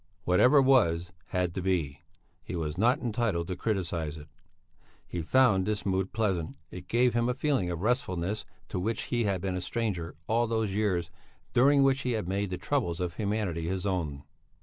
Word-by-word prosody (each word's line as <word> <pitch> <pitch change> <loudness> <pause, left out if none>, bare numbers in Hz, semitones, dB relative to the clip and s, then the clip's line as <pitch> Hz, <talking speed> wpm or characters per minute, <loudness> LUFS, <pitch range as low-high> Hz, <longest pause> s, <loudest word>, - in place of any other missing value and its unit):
Whatever 125 +11 +5
was, 90 -10 +3 0.2
had 90 -2 -1
to 95 - -3
be; 80 -7 -1 0.4
he - - -6
was 80 -3 -2
not 120 - +3
entitled 110 -7 0
to 90 - -2
criticize 85 -6 -2
it. 75 0 -12 0.8
He 85 - -4
found 105 0 +3
this 105 -2 -1
mood 95 -1 0
pleasant, 95 -9 -1 0.2
it 90 -1 -9
gave 120 +1 +3
him 120 +1 +1
a 125 - 0
feeling 135 -10 0
of 85 +1 -4
restfulness 105 -5 0 0.3
to - - -2
which 110 +4 -1
he 120 -2 -1
had 95 -3 0
been 95 -1 -2
a 90 - -2
stranger 95 -6 -2
all 115 +2 +1
those 110 -3 0
years 95 -4 0 0.4
during 140 +3 +5
which 135 0 +3
he 125 -2 -1
had 110 -5 -2
made 100 +1 -1
the 90 - -3
troubles 90 -5 -1
of 90 -2 -3
humanity 100 -6 -1
his 95 +1 -2
own. 80 -8 -2
95 Hz, 185 wpm, -29 LUFS, 90-115 Hz, 0.8 s, Whatever